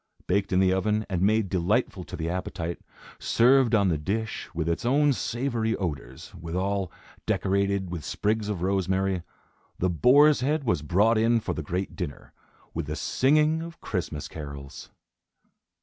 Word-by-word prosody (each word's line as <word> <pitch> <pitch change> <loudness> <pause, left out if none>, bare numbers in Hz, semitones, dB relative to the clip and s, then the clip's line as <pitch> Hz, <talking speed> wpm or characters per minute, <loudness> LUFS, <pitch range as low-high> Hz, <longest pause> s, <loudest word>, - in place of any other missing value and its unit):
Baked 100 +2 0
in 90 - +3
the 95 -1 +4
oven, 105 +3 0
and 90 -2 0
made 110 +1 +3
delightful 95 +3 0
to - - -7
the 80 - -3
appetite, 85 -1 -4 0.4
served 125 0 +4
on 100 -3 +3
the 80 -4 0
dish, 110 +7 -3
with 80 -1 -3
its 85 - -1
own 140 +4 +3
savory 120 -2 -1
odors; 70 -8 -5
withal, 95 +3 -2 0.4
decorated 100 -1 0
with 85 -4 -5
sprigs 105 +5 -1
of 95 -4 -3
rosemary, 95 -1 0 0.6
the 90 0 +1
boar's 140 - +5
head 145 +3 0
was 110 - 0
brought 105 +9 +3
in 115 +1 +3
for - - -3
the - - -4
great 90 +5 -3
dinner, 70 - -6 0.4
with 80 -3 -3
the 75 - -3
singing 150 - +2
of 170 0 -8
Christmas 85 -7 -4
carols. 70 -3 -9
95 Hz, 155 wpm, -26 LUFS, 85-115 Hz, 0.6 s, boar's